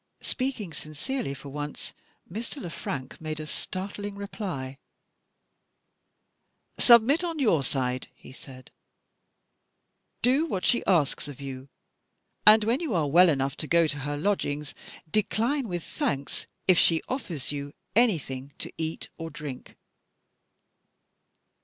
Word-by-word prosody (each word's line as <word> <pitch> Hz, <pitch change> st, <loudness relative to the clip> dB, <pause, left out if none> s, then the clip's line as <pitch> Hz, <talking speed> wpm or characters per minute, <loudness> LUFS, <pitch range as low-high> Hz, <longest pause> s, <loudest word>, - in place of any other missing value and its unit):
Speaking 250 Hz, -10 st, -2 dB
sincerely 155 Hz, -, -4 dB
for 140 Hz, +1 st, -10 dB
once, 145 Hz, +1 st, -6 dB, 0.3 s
Mr. 230 Hz, -, -4 dB
Le 175 Hz, -8 st, -6 dB
Frank 135 Hz, -4 st, -5 dB
made 155 Hz, -1 st, -4 dB
a 155 Hz, -, -4 dB
startling 200 Hz, +5 st, -4 dB
reply. 180 Hz, -10 st, -5 dB, 2.0 s
"Submit 245 Hz, +8 st, +7 dB
on 335 Hz, -2 st, -2 dB
your 215 Hz, -, +3 dB
side," 130 Hz, -1 st, -1 dB
he -, -, -14 dB
said. 130 Hz, -1 st, -12 dB, 1.5 s
"Do 270 Hz, +7 st, +4 dB
what 190 Hz, -, -2 dB
she 240 Hz, -, +4 dB
asks 160 Hz, -7 st, +2 dB
of 145 Hz, -2 st, -9 dB
you. 135 Hz, -1 st, -7 dB, 0.8 s
And 215 Hz, +1 st, +9 dB
when 230 Hz, +5 st, +2 dB
you 310 Hz, -, -1 dB
are 160 Hz, -3 st, +2 dB
well 175 Hz, +5 st, +7 dB
enough 135 Hz, -2 st, +1 dB
to 155 Hz, -, -3 dB
go 170 Hz, +1 st, +5 dB
to 145 Hz, -2 st, -2 dB
her 145 Hz, +1 st, -3 dB
lodgings, 150 Hz, -5 st, -1 dB, 0.3 s
decline 230 Hz, -, +1 dB
with 175 Hz, -4 st, -3 dB
thanks 140 Hz, -1 st, -2 dB, 0.2 s
if 185 Hz, -2 st, +6 dB
she 165 Hz, -1 st, +4 dB
offers 180 Hz, -, -3 dB
you 145 Hz, -1 st, -4 dB, 0.2 s
anything 145 Hz, -, +1 dB
to -, -, -6 dB
eat 160 Hz, 0 st, -3 dB
or 165 Hz, 0 st, -4 dB
drink." 145 Hz, -5 st, -8 dB
165 Hz, 130 wpm, -27 LUFS, 140-215 Hz, 2.0 s, And